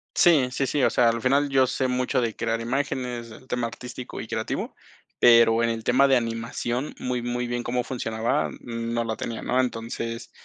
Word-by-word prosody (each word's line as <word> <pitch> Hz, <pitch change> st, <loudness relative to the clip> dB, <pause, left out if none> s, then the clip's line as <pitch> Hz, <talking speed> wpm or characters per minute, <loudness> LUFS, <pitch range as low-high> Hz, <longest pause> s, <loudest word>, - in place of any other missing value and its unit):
Sí, 150 Hz, -8 st, +5 dB
sí, 135 Hz, +1 st, 0 dB
sí, 145 Hz, -, 0 dB
o -, -, +5 dB
sea, 120 Hz, -1 st, +4 dB
al 115 Hz, 0 st, -1 dB
final 140 Hz, +2 st, +2 dB
yo 135 Hz, -1 st, +4 dB
sé 130 Hz, +1 st, 0 dB
mucho 125 Hz, 0 st, 0 dB
de 115 Hz, -3 st, -1 dB
crear 115 Hz, 0 st, -1 dB
imágenes, 125 Hz, -2 st, -2 dB
del 120 Hz, +3 st, -14 dB
tema 120 Hz, -2 st, -1 dB
artístico 125 Hz, +2 st, -8 dB
y -, -, -6 dB
creativo, 110 Hz, -1 st, -3 dB, 0.4 s
pero 115 Hz, -1 st, +6 dB
en 115 Hz, -, +2 dB
el 115 Hz, -1 st, -3 dB
tema 130 Hz, +4 st, +4 dB
de 135 Hz, -1 st, +5 dB
animación, 115 Hz, +3 st, -3 dB
muy 125 Hz, -1 st, -2 dB
muy 120 Hz, 0 st, -2 dB
bien 120 Hz, 0 st, -2 dB
cómo 125 Hz, 0 st, -1 dB
funcionaba, 115 Hz, -, -1 dB
mm, 115 Hz, -, -5 dB
no 120 Hz, 0 st, 0 dB
la 110 Hz, -1 st, -2 dB
tenía, 115 Hz, +2 st, -5 dB
¿no? 125 Hz, -, +1 dB
Entonces, 115 Hz, -1 st, -4 dB
120 Hz, 200 wpm, -25 LUFS, 115-125 Hz, 0.4 s, pero